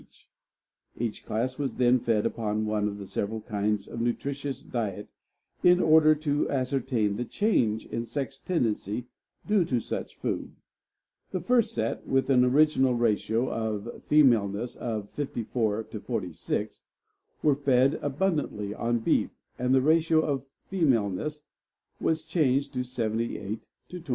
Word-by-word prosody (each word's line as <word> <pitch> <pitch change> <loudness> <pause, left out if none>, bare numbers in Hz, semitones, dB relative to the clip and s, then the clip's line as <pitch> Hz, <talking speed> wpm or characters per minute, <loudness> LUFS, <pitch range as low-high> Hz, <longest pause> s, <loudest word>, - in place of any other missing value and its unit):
Each 115 -2 -3
class 125 +5 -2
was 140 -2 -2
then 125 0 +4
fed 115 -3 +1
upon 110 -1 -1
one 105 -1 0
of 100 -1 -6
several 110 +3 -3
kinds 105 -1 -1
of 115 - -5
nutritious 140 +4 -2
diet 105 -4 -4 0.5
in 180 0 +6
order 155 -2 +6
to 145 -1 0
ascertain 130 -6 0
the 120 - -1
change 120 - +1
in 115 0 -4
sex 135 +2 -4
tendency 115 - -1 0.4
due 205 -3 +3
to 125 -6 0
such - - -5
food. - - -4 0.7
The 185 - -2
first 230 +4 +2
set, - - -2
with 135 +1 +2
an 125 -2 +5
original 135 -1 +4
ratio 115 +1 +1
of 110 0 -3
femaleness 120 -6 +3
of 110 -4 -4
54 115 -5 -2
to 110 - -5
46, - - -3 0.6
were 150 - +5
fed 135 -1 +2
abundantly 145 - -1
on 120 +2 0
beef, - - +2 0.3
and 125 +1 +1
the 130 - +5
ratio 160 +1 +4
of 140 -4 -2 0.2
femaleness 150 - 0 0.5
was 160 -1 0
changed 145 -4 +1
to 125 -1 -1
78 115 -3 -3 0.2
to 180 - -6
22. - - -14
125 Hz, 135 wpm, -28 LUFS, 110-145 Hz, 0.7 s, in